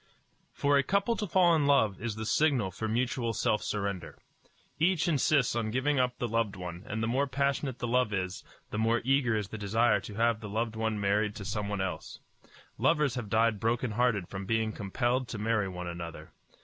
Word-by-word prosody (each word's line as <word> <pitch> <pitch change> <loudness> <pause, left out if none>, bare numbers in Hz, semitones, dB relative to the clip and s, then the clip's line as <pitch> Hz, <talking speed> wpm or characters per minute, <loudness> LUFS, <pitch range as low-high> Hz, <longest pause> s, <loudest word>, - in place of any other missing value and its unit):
For 140 0 +2
a - - +2
couple 200 - +1
to 210 - -2
fall 175 -1 +4
in 150 -3 +2
love 110 -9 +3
is 115 -2 -3
the 110 0 -5
signal 125 -6 +2
for 110 +5 -4
mutual 120 +1 0
self 105 -1 +1
surrender. 100 -4 -3 0.6
Each 175 +1 +2
insists 145 -5 +2
on 115 -2 -1
giving 130 +4 +1
up 125 -1 +1
the 120 - -2
loved 115 -3 0
one; 90 -1 -7
and 110 +1 -3
the - - 0
more 135 +5 +1
passionate 140 -1 -1
the - - -3
love 125 -2 +2
is, 95 -2 -3 0.3
the 105 - -2
more 115 +1 +2
eager 130 -3 +2
is 105 -2 -3
the 110 - -7
desire 110 +3 +2
to 105 - -9
have 115 0 +2
the 105 -2 -7
loved 110 +2 -2
one 110 -1 -1
married 105 +1 +1
to 100 - -7
someone 105 0 -2
else. 95 -1 -4 0.6
Lovers 150 +1 +2
have 115 -4 -5
died 110 0 +2
broken 115 +2 0
hearted 105 -5 +1
from 95 0 -6
being 110 0 +1
compelled 120 +5 -1
to 115 - -5
marry 110 -1 0
one 90 -1 -6
another. 85 -1 -7
115 Hz, 200 wpm, -30 LUFS, 105-130 Hz, 0.6 s, fall